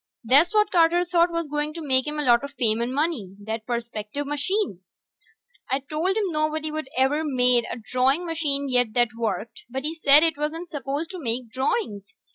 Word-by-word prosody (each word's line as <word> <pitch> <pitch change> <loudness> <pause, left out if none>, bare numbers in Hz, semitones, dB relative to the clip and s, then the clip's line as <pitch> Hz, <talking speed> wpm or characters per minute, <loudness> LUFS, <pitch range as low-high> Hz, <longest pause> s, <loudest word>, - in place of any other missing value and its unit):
That's 280 +9 +5
what 425 -1 +2
Carter 345 0 +3
thought 345 0 +3
was 335 -2 -3
going 295 +1 -2
to - - -5
make 260 +1 +2
him 300 0 -3
a 300 - -1
lot 240 -1 +4
of 280 0 -8
fame 230 -3 +1
and 240 +2 -1
money, 270 - -2
that 220 +1 -5
perspective 235 +2 -4
machine. 295 - -1 0.9
I 265 +2 +1
told 320 +8 -2
him 405 -4 0
nobody'd 310 -1 -2
ever 270 +4 +2
made 250 -4 +3
a - - -4
drawing 255 +8 +1
machine 295 -4 -1
yet 245 -4 +2
that 240 -1 +4
worked, 225 -1 -4
but 265 +2 -4
he 310 +2 -2
said 300 -2 +5
it 325 -2 +1
wasn't 325 +3 -4
supposed 290 +3 -4
to 370 - -7
make 240 -3 -1
drawings. 220 - -3
280 Hz, 190 wpm, -24 LUFS, 240-320 Hz, 0.9 s, That's